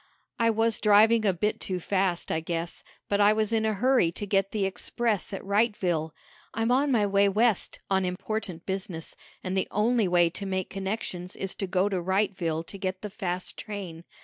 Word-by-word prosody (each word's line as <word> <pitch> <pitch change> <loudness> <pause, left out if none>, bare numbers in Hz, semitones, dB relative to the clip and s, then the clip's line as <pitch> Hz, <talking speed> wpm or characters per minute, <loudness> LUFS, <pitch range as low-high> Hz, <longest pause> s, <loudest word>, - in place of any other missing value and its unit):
"I 230 0 +4
was 225 0 +1
driving 215 +1 +5
a - - +5
bit 210 +4 -1
too 185 -1 -3
fast, 185 -1 0
I 160 - +1
guess, 165 +1 -4 0.2
but 205 0 +1
I 205 +1 +6
was 215 0 0
in 220 -1 +2
a 215 - 0
hurry 245 -5 +3
to 205 - -4
get 195 -1 +1
the 205 -2 -1
express 215 +2 -1
at 195 - -5
Wrightville. 195 -6 +1 0.5
I'm 225 +2 +1
on 275 +3 +3
my 220 -5 +3
way 200 0 +3
West, 215 +1 +1
on 190 -1 +2
important 180 -1 -4
business, 190 -4 -4 0.3
and 185 +1 -2
the 190 - +1
only 220 +1 +2
way 175 -1 +3
to 195 +3 -5
make 190 -1 -2
connections 190 -2 -4
is 195 - -3
to 195 - -4
go 185 +2 +2
to 195 -2 -1
Wrightville 180 -4 0
to 200 - -8
get 185 0 -3
the 210 - -5
fast 185 -4 -3
train. 190 -6 -7
195 Hz, 195 wpm, -27 LUFS, 185-215 Hz, 0.5 s, I